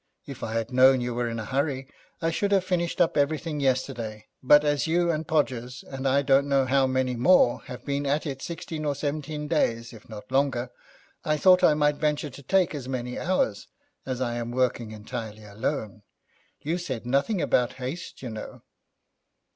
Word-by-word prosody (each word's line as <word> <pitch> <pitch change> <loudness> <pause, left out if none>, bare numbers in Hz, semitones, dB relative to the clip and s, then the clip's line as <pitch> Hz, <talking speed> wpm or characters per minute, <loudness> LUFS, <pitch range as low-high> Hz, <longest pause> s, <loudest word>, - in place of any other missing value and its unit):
If 135 -2 -9
I 110 - -4
had 115 +2 -2
known 130 +1 +6
you 120 0 -2
were 120 0 -1
in 115 - -4
a 110 - -4
hurry, 135 +2 -1 0.4
I 165 - +2
should 200 +5 -1
have 195 -2 +4
finished 175 -2 -1
up 175 - +3
everything 150 +1 0
yesterday, 125 -5 -1 0.2
but 150 +3 +6
as 145 +1 +1
you 170 +1 +2
and 155 -1 -3
Podgers, 125 -5 -1
and 135 0 -3
I 140 +2 +3
don't 140 +1 +3
know 135 -1 +3
how 135 +1 +3
many 130 -1 0
more, 125 -1 +4
have 125 - -9
been 140 0 -1
at 145 +4 0
it 135 -3 -4
sixteen 160 -2 -5
or 145 -2 0
seventeen 150 +1 -3
days, 115 -7 0
if 110 -1 -14
not 105 +1 -10
longer, 130 -3 +1 0.5
I 155 0 +1
thought 185 +3 +5
I 150 - +6
might 150 -1 +2
venture 150 -1 -1
to 135 - -11
take 185 +5 +2
as 135 -4 -6
many 125 -1 -3
hours, 165 - 0 0.4
as 130 -1 -4
I 120 -2 -1
am 120 0 -3
working 120 -2 0
entirely 110 0 -7
alone. 105 +1 -4 0.6
You 165 +4 -2
said 130 -10 -5
nothing 140 - +1
about 125 -5 +1
haste, 135 +5 -7
you 125 - -5
know.' 110 -1 -8
135 Hz, 190 wpm, -26 LUFS, 120-150 Hz, 0.6 s, known